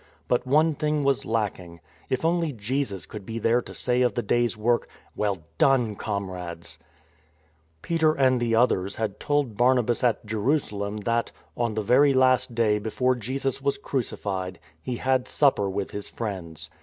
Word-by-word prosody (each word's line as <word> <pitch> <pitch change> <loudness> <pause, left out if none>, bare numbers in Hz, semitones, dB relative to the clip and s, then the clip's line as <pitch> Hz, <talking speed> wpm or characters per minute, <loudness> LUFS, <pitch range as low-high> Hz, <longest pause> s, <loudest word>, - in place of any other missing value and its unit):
But 125 +1 +1
one 155 +4 +4
thing 150 0 0
was 140 -1 +1
lacking. 95 -7 -2 0.3
If 130 +4 -1
only 165 -1 +1
Jesus 110 - -3
could 105 +5 -8
be 115 +4 -6
there 115 +2 +2
to - - -11
say 125 0 0
of 125 -4 +2
the 120 - -1
day's 120 +2 +1
work: 120 +2 +1
" - - -32
Well 100 -5 -1 0.2
done, 125 -6 +3
comrades! 90 -5 -5 0.5
" 80 +1 -39
Peter 160 -2 +2
and 130 -3 +3
the 115 -1 +1
others 100 -5 +2
had 110 -3 -3
told 145 -6 0
Barnabas 120 -1 +3
at 120 -2 +1
Jerusalem 105 -2 -1
that 115 +2 0
— - - -36
on. 115 -3 -1
the 110 - -1
very 135 +6 +4
last 130 -1 +3
day 110 -3 +2
before 125 +4 +1
Jesus 130 +3 -3
was 140 0 0
crucified 95 -8 -3
— 80 -1 -36
He 125 - -3
had 130 0 +1
supper 130 -9 +2
with 95 0 -3
His 105 0 -6
friends. 85 -8 -6
115 Hz, 175 wpm, -25 LUFS, 100-130 Hz, 0.5 s, one